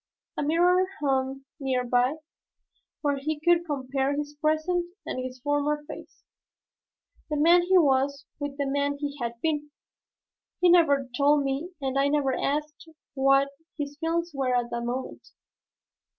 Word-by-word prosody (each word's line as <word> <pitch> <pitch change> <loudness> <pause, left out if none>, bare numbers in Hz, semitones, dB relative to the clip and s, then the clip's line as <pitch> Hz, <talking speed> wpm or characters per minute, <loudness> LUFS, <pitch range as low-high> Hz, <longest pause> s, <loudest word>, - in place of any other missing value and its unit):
A - - -2
mirror 355 +5 +3
hung 270 -1 -1
near 260 -3 0
by, 245 +3 +2 0.9
where 285 -1 +1
he 300 +2 -3
could 345 +1 +3
compare 270 -1 -1
his 295 0 -4
present 325 +3 +1 0.2
with - - -4
his 255 0 -7
former 295 +1 0
face, 300 - -11 1.1
the 300 - -1
man 340 +4 +6
he 370 +2 +3
was 280 -3 +2
with 285 -1 -4
the 285 - -1
man 285 +1 0
he 285 0 -4
had 235 0 -4
been. 300 -2 -1 0.9
He 360 - +5
never 285 -6 +4
told 285 +2 +4
me 275 +5 -2
and 270 -1 -1
I 275 - +3
never 285 -2 +1
asked 300 +3 -3 0.2
what 275 0 +3 0.3
his 290 -1 -4
feelings 335 +1 -1
were 265 -2 0
at 240 -1 -1
that 235 - -2
moment. 250 +2 -5
285 Hz, 150 wpm, -27 LUFS, 270-310 Hz, 1.1 s, man